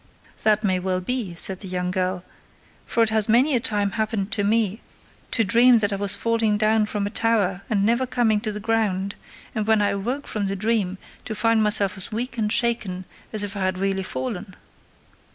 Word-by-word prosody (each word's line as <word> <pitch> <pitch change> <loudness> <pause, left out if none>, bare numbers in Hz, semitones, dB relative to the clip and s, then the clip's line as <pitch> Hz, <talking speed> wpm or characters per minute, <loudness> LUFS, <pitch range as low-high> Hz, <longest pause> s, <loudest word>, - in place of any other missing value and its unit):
"That 215 0 +2
may 185 -3 +1
well 185 0 -1
be," 200 -2 -3
said 190 +2 +2
the 195 - -5
young 180 0 -2
girl, 185 -1 -2 0.6
"for 230 - +2
it 220 - 0
has 220 -1 +2
many 255 +6 +4
a - - +4
time 205 -4 0
happened 215 -2 -2
to 205 - +1
me 215 0 +1 0.5
to 225 - +2
dream 235 +4 +5
that 205 -2 0
I - - -1
was 200 0 0
falling 225 -1 +1
down 215 0 +2
from 205 -1 -2
a 205 - -3
tower 210 -5 +1
and 200 -2 +1
never 235 +4 +2
coming 225 -4 +1
to 215 -1 -3
the 210 - -6
ground, 205 -3 0 0.4
and 215 -2 -2
when 220 -1 +4
I 205 -1 +2
awoke 235 +8 -2
from 205 -2 -2
the 195 - -2
dream 200 -2 0 0.3
to 220 - -4
find 225 +1 +2
myself 210 -2 +2
as 190 - -2
weak 235 +2 -4
and 210 -1 0
shaken 210 -7 +1 0.3
as 215 -2 -1
if 205 0 -5
I - - -4
had 185 0 -1
really 195 0 -1
fallen." 200 -1 -5
210 Hz, 205 wpm, -23 LUFS, 195-225 Hz, 0.6 s, dream